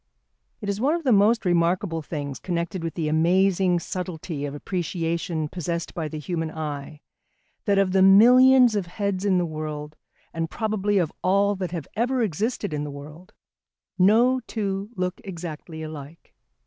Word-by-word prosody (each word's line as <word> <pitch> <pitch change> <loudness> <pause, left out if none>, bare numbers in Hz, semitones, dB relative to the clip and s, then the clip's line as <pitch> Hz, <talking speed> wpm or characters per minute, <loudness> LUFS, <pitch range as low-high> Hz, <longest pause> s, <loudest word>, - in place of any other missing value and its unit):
It - - -5
is 200 +1 -2
one 290 +6 +2
of 340 - -4
the 265 - +2
most 215 +2 +4
remarkable 175 0 +1
things 145 -4 -5
connected 170 +1 -3
with 165 - -4
the 160 -3 -2
amazing 180 +3 +3
subtlety 170 -4 -5
of 145 0 -5
appreciation 170 -1 -2
possessed 170 0 -4
by 160 -2 -3
the 155 - -6
human 165 +1 -3
eye, 150 -1 -6 0.6
that 200 -2 +2
of 195 -1 +3
the 190 0 +3
millions 245 +5 +7
of 195 -4 -1
heads 200 +1 -2
in 190 -2 +3
the 175 - +1
world, 155 -1 -6 0.4
and 165 0 -2
probably 210 -1 -1
of 170 -5 0
all 200 +2 +3
that 185 -2 -3
have 165 -4 -5
ever 245 +3 +1
existed 210 0 -2
in 145 -1 -2
the 150 - -5
world, 150 +8 -11 0.7
no 235 +7 +5
two 200 -2 -3
look 185 +3 -3
exactly 165 -4 -7
alike. 155 0 -10
180 Hz, 160 wpm, -24 LUFS, 160-200 Hz, 0.7 s, millions